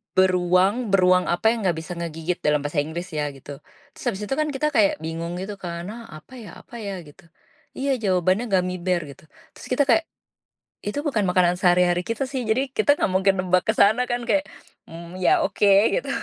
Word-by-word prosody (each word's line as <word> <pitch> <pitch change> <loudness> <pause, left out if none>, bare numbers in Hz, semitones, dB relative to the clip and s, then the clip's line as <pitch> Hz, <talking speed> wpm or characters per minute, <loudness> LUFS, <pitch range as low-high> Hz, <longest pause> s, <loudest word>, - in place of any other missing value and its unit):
"Beruang 185 +2 +3 0.2
beruang 180 -1 +3
apa 175 +5 -2
yang 220 -5 -2
gak 170 - +1
bisa 165 +3 -9
ngegigit?" 165 +1 -4
dalam 150 -1 +1
bahasa 145 +1 -1
Inggris 165 +5 -4
ya 150 -1 -2
gitu, 140 +1 -10 0.3
terus - - -14
habis 210 -3 -2
itu 210 - -7
kan 305 - +1
kita 300 +3 0
kayak 205 -3 +4
bingung 165 +2 -4
gitu 205 +1 -5
kan, 170 -1 -6
"Hah, 235 +1 -9
apa 255 - -17
ya? 215 - -10
Apa 240 - -15
ya?" 200 -2 -5
Gitu, 145 +1 -17 0.5
iya 275 +1 -1
jawabannya 185 +4 +1
gummy 185 -1 +1
bear 180 -1 0
gitu 140 - -17 0.3
terus - - -13
kita 285 +3 +3
kayak, 325 +7 +4 0.8
itu 210 +8 -2
bukan 235 -10 0
makanan 180 -1 +3
sehari-hari 180 -1 +3
kita 230 +4 -1
sih 255 -4 -3
jadi 240 +4 +2 0.2
kita - - 0
gak - - +1
mungkin 190 +1 +3
nebak 185 0 +2
ke 220 - +2
sana 215 +5 +5
kan 240 0 -1
kayak, 200 -2 +2 0.4
mmm, 170 +2 -10
ya 360 -3 +4
oke 205 -7 +1 0.3
gitu - - -3
185 Hz, 200 wpm, -23 LUFS, 175-220 Hz, 0.8 s, sana